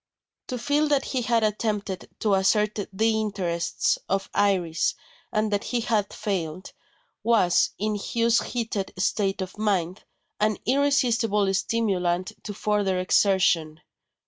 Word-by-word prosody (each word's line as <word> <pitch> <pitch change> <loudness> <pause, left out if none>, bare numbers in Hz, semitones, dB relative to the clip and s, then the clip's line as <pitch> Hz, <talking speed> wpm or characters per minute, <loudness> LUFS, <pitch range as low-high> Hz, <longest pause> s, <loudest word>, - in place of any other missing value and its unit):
To 250 - -3
feel 290 +5 +1
that 285 -2 +1
he 260 - -1
had 235 -2 +1
attempted 210 -3 -2
to 210 -2 +2
assert 210 +2 +2
the 220 +3 +1
interests 180 -5 -1
of 195 0 -1
Iris, 180 -5 +1 0.4
and 215 0 0
that 205 - -1
he 245 -2 -1
had 215 -4 0
failed, 185 -4 -4 0.5
was, 215 -6 +3
in 215 +1 -1
Hugh's 230 +3 +1
heated 220 -5 -3
state 195 +1 0
of 190 +2 -6
mind, 190 -4 -1 0.4
an 215 0 +1
irresistible 240 -7 +2
stimulant 190 -4 0
to - - -4
further 205 -3 0
exertion. 180 -4 +2
210 Hz, 125 wpm, -25 LUFS, 190-225 Hz, 0.5 s, was